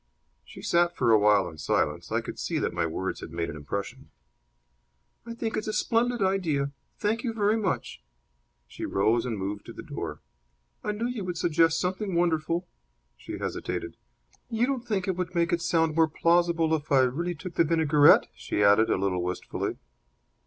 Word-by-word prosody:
She - - -12
sat 175 0 +2
for 120 -3 +2
a 110 - +6
while 105 -1 +4
in 80 - -10
silence. - - -1
I - - +1
could - - -8
see - - -2
that - - -1
my 85 -1 0
words 95 +4 -3
had - - -8
made 85 +1 -3
an - - -8
impression. 75 +7 -6 1.2
"I 230 - -6
think 225 -1 -3
it's 215 - -3
a 215 - -2
splendid 240 -1 +1
idea. 165 -8 0 0.3
Thank 220 +2 -1
you 235 -3 -2
very 210 -1 +2
much." 195 - -2 0.7
She - - -9
rose 110 +5 +1
and 115 -3 -2
moved 100 +1 -4
to - - -8
the - - -9
door. - - -6 0.6
"I 210 - -1
knew 210 +3 -3
you 245 -4 -3
would 180 -2 -4
suggest 165 -1 +3
something 190 +1 -2
wonderful." 170 0 +1 0.5
She - - -7
hesitated. - - -4 0.5
"You 230 0 +1
don't 255 -2 -3
think 200 -5 -1
it 185 -2 -1
would 180 0 -3
make 170 0 +2
it 170 - +1
sound 165 -2 +2
more 165 -1 +5
plausible 170 0 +2
if 155 -1 -2
I 135 -2 +6
really 165 +8 0
took 175 +3 -8
the 170 - +4
vinaigrette?" 155 -2 +5
she 105 - -2
added, 105 +2 +5
a - - +2
little 95 -1 0
wistfully. 90 0 -3
165 Hz, 190 wpm, -27 LUFS, -, 1.2 s, a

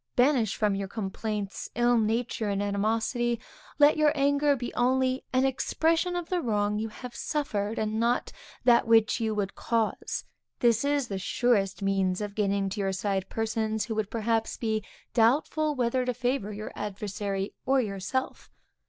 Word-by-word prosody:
Banish 245 -4 +3
from 210 -2 +1
your 195 0 -2
complaints 205 0 -4
ill 240 +1 +3
nature 225 0 0
and 200 -1 0
animosity; 225 +4 0 0.4
let 295 +1 +6
your 305 -1 +4
anger 285 0 +3
be 245 -2 -5
only 260 +1 +1
an 255 +1 +3
expression 325 +6 +1
of 350 -1 -3
the 360 -1 0
wrong 210 -4 0
you 220 +1 -2
have 245 +3 -9
suffered, 220 -8 -2
and 215 0 -1
not 235 +2 +1
of - - -23 0.3
that 240 -1 +5
which 225 +1 +4
you 220 -2 -1
would 200 -2 -1
cause; 225 -2 -1 0.3
this 235 -1 +3
is 285 -2 +1
the 195 -3 -3
surest 200 -1 +1
means 195 -2 +1
of 205 -1 -4
gaining 200 -1 0
to 200 - -5
your 195 -1 0
side 195 0 -1
persons 220 -1 -1
who 230 - -3
would 215 -2 -1
perhaps 225 0 -1
be 220 -2 -1 0.3
doubtful 295 +6 +2
whether 250 0 +1
to 250 -1 -2
favor 245 -3 -1
your 210 +1 -6
adversary 200 -1 -3
or 270 0 +4
yourself. 205 +3 -3
225 Hz, 165 wpm, -28 LUFS, 205-255 Hz, 0.4 s, let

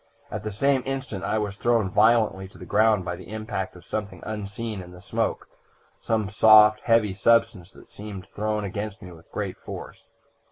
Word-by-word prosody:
At - - -4
the 105 +1 -4
same 135 +6 +2
instant 130 -8 -4
I 110 - 0
was 105 -2 -3
thrown 115 -3 +2
violently 105 -1 +3
to 95 - -17
the - - -10
ground 105 -2 +3
by 90 -1 -3
the - - -12
impact 110 -4 -4
of 90 - -14
something 105 -1 -5
unseen 105 0 -5
in 90 0 -11
the 90 - -12
smoke - - -2 0.5
some 110 -3 -1
soft, 105 0 +7
heavy 115 -4 +2
substance 115 -3 +2
that - - -16
seemed 100 -3 -8
thrown 105 0 -1
against 105 +2 -5
me 90 - -9
with 80 -1 -16
great - - -4
force. - - -9
105 Hz, 185 wpm, -25 LUFS, 95-110 Hz, 0.5 s, soft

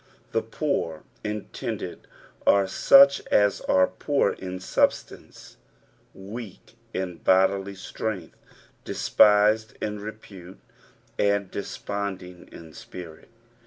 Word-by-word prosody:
The - - +1
rMwr 80 -2 -3 0.2
intended, 105 -1 -5 0.4
are 100 -1 +5
such 140 +8 +6
as 105 -1 +3
are 95 0 +3
poor 120 +7 0
in 95 0 -7
substance, 90 - -2 0.6
wealc 100 +1 -9 0.2
in 90 -4 -4
bodily 95 +2 +2
strength, 95 -2 -5 0.5
despised 105 +1 +3
in 105 -1 -3
repute, 100 -3 -10 0.6
and 100 -2 +1
desponding 100 -3 -6
in 80 -2 -12
spirit. 85 -2 -11
100 Hz, 90 wpm, -25 LUFS, 95-105 Hz, 0.6 s, such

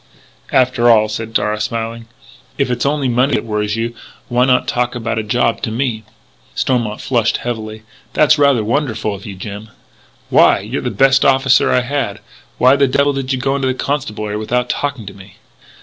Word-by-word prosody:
"After 125 -2 +3
all," 110 -2 +5
said 110 +1 -5
Darragh, 105 -1 0
smiling, 115 +1 -4 0.5
"if 135 -3 0
it's 125 +2 0
only 145 -2 0
money 125 +2 +2
that - - -1
worries 105 -1 -2
you, 115 +1 -3 0.4
why 125 +1 +3
not 130 -1 +2
talk 125 0 -1
about 115 -1 -2
a - - -2
job 115 +1 0
to - - -2
me!" 115 -1 -2 0.5
Stormont 120 -5 -1
flushed 120 -4 +1
heavily: 110 -2 -5 0.3
"That's 155 0 +4
rather 140 -6 +3
wonderful 110 -3 -1
of 100 +1 -9
you, 100 - -7
Jim 105 +3 -8 0.3
" - - -33
"Why? - - +5
You're 110 +7 -4
the 125 - -2
best 135 +5 +3
officer 135 -1 +3
I 125 - +3
had. 125 -6 -3 0.4
Why 130 +2 +5
the 140 0 +3
devil 140 +2 +2
did 135 -1 -3
you 130 - 0
go 135 +2 -1
into 135 -1 -1
the 130 - 0
Constabulary 110 -8 -3
without 125 +3 -1
talking 140 -6 -3
to 100 - -8
me?" 95 -1 -15
120 Hz, 190 wpm, -17 LUFS, 110-135 Hz, 0.5 s, all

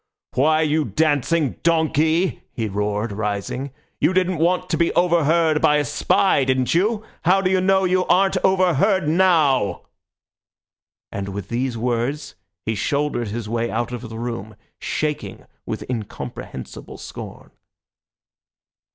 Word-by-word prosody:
Why, 155 +5 +3
you 155 0 +1
dancing 150 - +1
donkey," 160 +1 +2
he 115 -3 -2
roared, 105 +2 -2
rising, 105 +6 -3 0.3
"you 185 - +2
didn't 185 -2 +1
want 180 +2 +1
to - - +1
be 170 -1 +2
overheard 165 -2 +3
by 150 - +4
a 150 0 +1
spy, 150 +2 +2
didn't 130 -1 +1
you? 210 +5 +1 0.2
How 185 +3 +5
do 185 -1 0
you 185 -1 +3
know 190 +1 +3
you 185 0 +2
aren't 190 +1 +3
overheard 185 -1 +3
now?" 155 - +3 1.3
And 100 -1 -4
with 100 0 -6
these 120 0 -2
words 125 +5 -2 0.3
he 110 - 0
shouldered 140 +2 -1
his 110 +1 -5
way 115 +1 -1
out 120 +2 -2
of 120 -1 -6
the 115 - -7
room, 115 -3 -5 0.2
shaking 150 -1 -3 0.2
with - - -5
incomprehensible 105 - -7
scorn. - - -9
150 Hz, 135 wpm, -21 LUFS, 115-175 Hz, 1.3 s, How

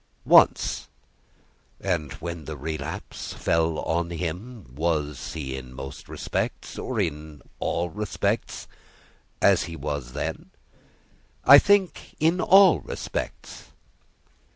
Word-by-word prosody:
"Once." - - +4 0.9
"And 85 -7 -2
when 85 -2 -6
the 75 0 -6
relapse 75 +1 -5
fell 80 -1 +1
on 85 +2 -1
him, 90 - -6
was 75 -2 -2
he 70 -5 -4
in 65 -1 -9
most 65 0 -8
respects - - -4
or 125 -4 -3
in 75 -5 -3 0.2
all 85 0 -1
respects 105 -1 -2 0.8
as - - +5
he 85 - -7
was 70 -6 -4
then?" - - -4 1.0
"I 140 - +11
think 200 0 +1
in 165 +4 +2
all 190 -2 +7
respects." - - -6
80 Hz, 105 wpm, -25 LUFS, 75-100 Hz, 1.0 s, I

